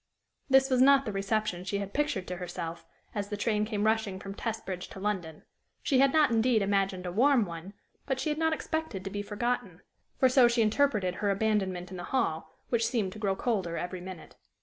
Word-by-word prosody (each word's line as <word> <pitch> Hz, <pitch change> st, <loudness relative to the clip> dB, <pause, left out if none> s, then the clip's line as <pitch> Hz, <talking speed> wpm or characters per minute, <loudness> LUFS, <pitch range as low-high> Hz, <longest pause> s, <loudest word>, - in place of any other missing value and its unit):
This 265 Hz, 0 st, +5 dB
was 255 Hz, -1 st, +4 dB
not 275 Hz, 0 st, +6 dB
the 215 Hz, -, -2 dB
reception 195 Hz, -2 st, -1 dB
she 195 Hz, +2 st, -2 dB
had 200 Hz, 0 st, -5 dB
pictured 290 Hz, -11 st, 0 dB
to 180 Hz, -, -4 dB
herself, 175 Hz, -2 st, -6 dB, 0.3 s
as 205 Hz, -1 st, -3 dB
the 205 Hz, -, -3 dB
train 210 Hz, 0 st, +1 dB
came 210 Hz, -2 st, -2 dB
rushing 220 Hz, -3 st, +1 dB
from 195 Hz, 0 st, -7 dB
Testbridge 200 Hz, -5 st, -4 dB
to -, -, -10 dB
London; 185 Hz, -6 st, -3 dB, 0.4 s
she 265 Hz, -, +3 dB
had 275 Hz, 0 st, +5 dB
not, 305 Hz, -3 st, +4 dB
indeed, 225 Hz, -1 st, +3 dB
imagined 195 Hz, -2 st, 0 dB
a 180 Hz, -, -3 dB
warm 250 Hz, +3 st, +4 dB
one, 170 Hz, +2 st, -8 dB, 0.3 s
but 265 Hz, -1 st, -1 dB
she 310 Hz, -, -1 dB
had 300 Hz, +1 st, -1 dB
not 320 Hz, 0 st, +2 dB
expected 315 Hz, -, -3 dB
to 195 Hz, -, -5 dB
be 205 Hz, -, -3 dB
forgotten 235 Hz, +4 st, -3 dB, 0.4 s
for 260 Hz, -, +5 dB
so 255 Hz, -1 st, +6 dB
she 235 Hz, -1 st, +2 dB
interpreted 215 Hz, -5 st, +2 dB
her 205 Hz, -, 0 dB
abandonment 195 Hz, -3 st, 0 dB
in 185 Hz, -, -6 dB
the 175 Hz, -, -6 dB
hall, 165 Hz, -12 st, -1 dB, 0.2 s
which 230 Hz, -2 st, +2 dB
seemed 210 Hz, -7 st, -1 dB
to 215 Hz, -, -10 dB
grow 200 Hz, -3 st, 0 dB
colder 190 Hz, -8 st, -1 dB
every 180 Hz, 0 st, -4 dB
minute. 185 Hz, -1 st, -9 dB
210 Hz, 210 wpm, -29 LUFS, 185-245 Hz, 0.4 s, not